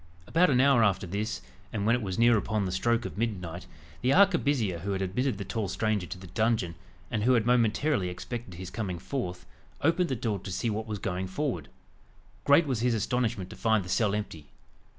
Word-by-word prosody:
About 180 Hz, -, +3 dB
an 125 Hz, -3 st, +3 dB
hour 135 Hz, -3 st, +5 dB
after 95 Hz, -2 st, +2 dB
this, 100 Hz, -, -3 dB, 0.3 s
and 100 Hz, -1 st, -2 dB
when 115 Hz, +2 st, +4 dB
it 125 Hz, -, -2 dB
was 95 Hz, -4 st, -3 dB
near 120 Hz, 0 st, +5 dB
upon 110 Hz, -1 st, 0 dB
the 90 Hz, -, -2 dB
stroke 115 Hz, +5 st, +1 dB
of -, -, -6 dB
midnight, 90 Hz, -7 st, -3 dB, 0.3 s
the 130 Hz, -, +2 dB
arquebusier 145 Hz, -, +3 dB
who 100 Hz, +4 st, -3 dB
had 95 Hz, -, -2 dB
admitted 115 Hz, +5 st, -1 dB
the 100 Hz, -, -5 dB
tall 105 Hz, +1 st, -2 dB
stranger 105 Hz, -1 st, -1 dB
to -, -, -6 dB
the 90 Hz, -, -11 dB
dungeon, 110 Hz, -1 st, 0 dB, 0.4 s
and 110 Hz, -, 0 dB
who 125 Hz, +4 st, +4 dB
had 115 Hz, -3 st, +3 dB
momentarily 120 Hz, -2 st, +2 dB
expected 100 Hz, +2 st, -6 dB
his 90 Hz, +1 st, -7 dB
coming 100 Hz, -6 st, -3 dB
forth, 90 Hz, -2 st, -4 dB, 0.4 s
opened 170 Hz, +4 st, +2 dB
the 130 Hz, -, 0 dB
door 110 Hz, -4 st, -2 dB
to 95 Hz, -, -7 dB
see 115 Hz, +5 st, -1 dB
what 110 Hz, +1 st, -3 dB
was 105 Hz, -1 st, -3 dB
going 95 Hz, -1 st, -3 dB
forward. 95 Hz, -, -3 dB, 0.8 s
Great 145 Hz, +3 st, +6 dB
was 130 Hz, -6 st, -1 dB
his 120 Hz, 0 st, +2 dB
astonishment 110 Hz, -4 st, -1 dB
to -, -, -8 dB
find 110 Hz, -4 st, +1 dB
the -, -, -8 dB
cell 105 Hz, +2 st, +2 dB
empty! 85 Hz, -8 st, -5 dB
110 Hz, 210 wpm, -28 LUFS, 95-125 Hz, 0.8 s, Great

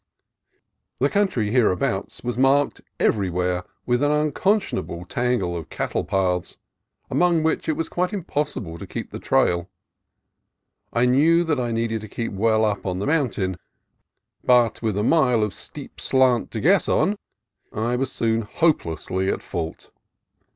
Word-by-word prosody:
The 140 Hz, +2 st, +1 dB
country 160 Hz, -, +1 dB
hereabouts 110 Hz, -7 st, 0 dB
was 120 Hz, 0 st, -2 dB
marked 135 Hz, +3 st, +2 dB, 0.2 s
everywhere 90 Hz, -2 st, +1 dB, 0.2 s
with 120 Hz, +1 st, +1 dB
an 145 Hz, -, +3 dB
unconscionable 150 Hz, -, 0 dB
tangle 120 Hz, -6 st, -1 dB
of 85 Hz, -2 st, -6 dB
cattle -, -, -2 dB
paths, 90 Hz, -3 st, -1 dB, 0.5 s
among 170 Hz, -2 st, +3 dB
which 160 Hz, 0 st, 0 dB
it -, -, +3 dB
was 165 Hz, -, -2 dB
quite 180 Hz, +2 st, -1 dB
impossible 145 Hz, -, -3 dB
to -, -, -8 dB
keep -, -, -6 dB
the -, -, -6 dB
trail. 85 Hz, 0 st, +1 dB, 1.2 s
I 120 Hz, +1 st, +2 dB
knew 155 Hz, +7 st, +4 dB
that 155 Hz, -5 st, 0 dB
I 120 Hz, -1 st, -1 dB
needed 115 Hz, -1 st, -1 dB
to 110 Hz, -, -8 dB
keep 115 Hz, +2 st, -4 dB
well 110 Hz, +2 st, +2 dB
up 105 Hz, -2 st, -1 dB
on 90 Hz, -1 st, -2 dB
the 100 Hz, -, -2 dB
mountain, 120 Hz, -, 0 dB, 0.9 s
but 120 Hz, -3 st, +3 dB
with 110 Hz, -3 st, -1 dB
a 105 Hz, -, +1 dB
mile 125 Hz, -6 st, +3 dB
of 105 Hz, -3 st, -2 dB
steep -, -, -8 dB
slant 130 Hz, -3 st, +2 dB
to 115 Hz, -, -4 dB
guess 185 Hz, -, +3 dB
on 205 Hz, -, +2 dB, 0.6 s
I 115 Hz, +3 st, -1 dB
was 130 Hz, +1 st, -1 dB
soon 115 Hz, 0 st, +1 dB
hopelessly 95 Hz, -, 0 dB
at -, -, -2 dB
fault. 80 Hz, -3 st, -5 dB
120 Hz, 150 wpm, -23 LUFS, 95-145 Hz, 1.2 s, knew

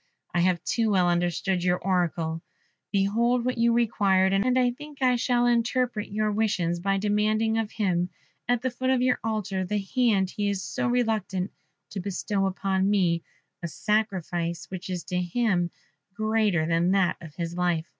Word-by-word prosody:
I 175 Hz, -, +1 dB
have 175 Hz, -1 st, +2 dB
too 230 Hz, -2 st, +1 dB
well 185 Hz, -3 st, +3 dB
understood 175 Hz, +1 st, 0 dB
your 180 Hz, 0 st, +2 dB
oracle; 170 Hz, -3 st, -1 dB, 0.5 s
behold 230 Hz, +5 st, +2 dB
what 250 Hz, -2 st, -1 dB
you 235 Hz, 0 st, +4 dB
required, 195 Hz, -5 st, +2 dB
and 245 Hz, +6 st, +2 dB
I 250 Hz, -1 st, +3 dB
think 295 Hz, +3 st, -11 dB
I 255 Hz, -2 st, +3 dB
shall 245 Hz, 0 st, +1 dB
interpret 240 Hz, -2 st, 0 dB
your 215 Hz, +1 st, 0 dB
wishes 200 Hz, -5 st, 0 dB
by 195 Hz, +2 st, 0 dB
demanding 215 Hz, +2 st, +1 dB
of 220 Hz, -2 st, -2 dB
him, 180 Hz, -4 st, 0 dB, 0.4 s
at 245 Hz, 0 st, +1 dB
the 255 Hz, -, 0 dB
foot 260 Hz, +2 st, -2 dB
of 260 Hz, -1 st, +2 dB
your 255 Hz, 0 st, +2 dB
altar, 210 Hz, -4 st, -2 dB
the 210 Hz, +3 st, -1 dB
hand 200 Hz, -2 st, +1 dB
he 205 Hz, -2 st, -1 dB
is 195 Hz, -2 st, -2 dB
so -, -, -2 dB
reluctant 220 Hz, -6 st, 0 dB, 0.4 s
to 200 Hz, -, -4 dB
bestow 195 Hz, +1 st, -1 dB
on 190 Hz, 0 st, +2 dB
me; 175 Hz, -5 st, +2 dB, 0.4 s
a 170 Hz, -, -3 dB
sacrifice 175 Hz, -4 st, -1 dB
which 185 Hz, +1 st, -6 dB
is 180 Hz, -2 st, -3 dB
to 180 Hz, 0 st, -2 dB
him 180 Hz, -1 st, 0 dB, 0.5 s
greater 215 Hz, -6 st, +1 dB
than 165 Hz, +2 st, +2 dB
that 190 Hz, -3 st, +2 dB
of 160 Hz, -3 st, -11 dB
his 170 Hz, -1 st, -4 dB
life." 175 Hz, -2 st, 0 dB
200 Hz, 170 wpm, -26 LUFS, 180-225 Hz, 0.5 s, you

